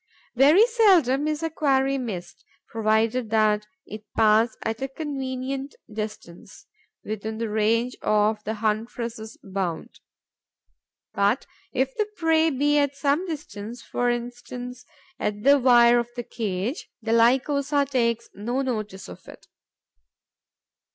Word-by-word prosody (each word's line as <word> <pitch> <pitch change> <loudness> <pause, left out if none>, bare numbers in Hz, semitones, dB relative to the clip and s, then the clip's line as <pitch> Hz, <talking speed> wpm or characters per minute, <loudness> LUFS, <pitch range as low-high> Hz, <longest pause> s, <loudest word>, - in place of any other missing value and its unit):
Very 300 - +6
seldom 360 - +3
is 305 +1 -2
a 325 - -1
quarry 275 -3 +1
missed, 185 -8 -6 0.3
provided 220 +2 +1
that 215 -1 +2 0.2
it 215 +1 -9
pass 220 +1 +4
at 225 +2 -3
a 270 - -1
convenient 270 -1 -4 0.2
distance, 210 -5 -8 0.4
within 220 +1 -5
the 230 0 -2
range 230 +3 +1
of 210 0 +1
the 220 - -3
huntress' 220 +1 -3
bound. 190 -4 -4 1.1
But, 200 +6 +1 0.3
if 265 0 -1
the 425 - 0
prey 325 -1 +3
be 290 +1 +2
at 285 -1 0
some 285 +6 0
distance, 235 -7 -7
for 245 0 -1
instance 245 +1 -5 0.3
on 210 0 -3
the 280 +1 +6
wire 240 -1 +6
of 235 0 -3
the 240 - -4
cage, 220 - -4
the 225 0 0
Lycosa 275 +5 +3
takes 235 -4 0
no 240 +7 -2
notice 215 -6 -4
of - - -12
it. - - -13
240 Hz, 125 wpm, -25 LUFS, 215-275 Hz, 1.1 s, Very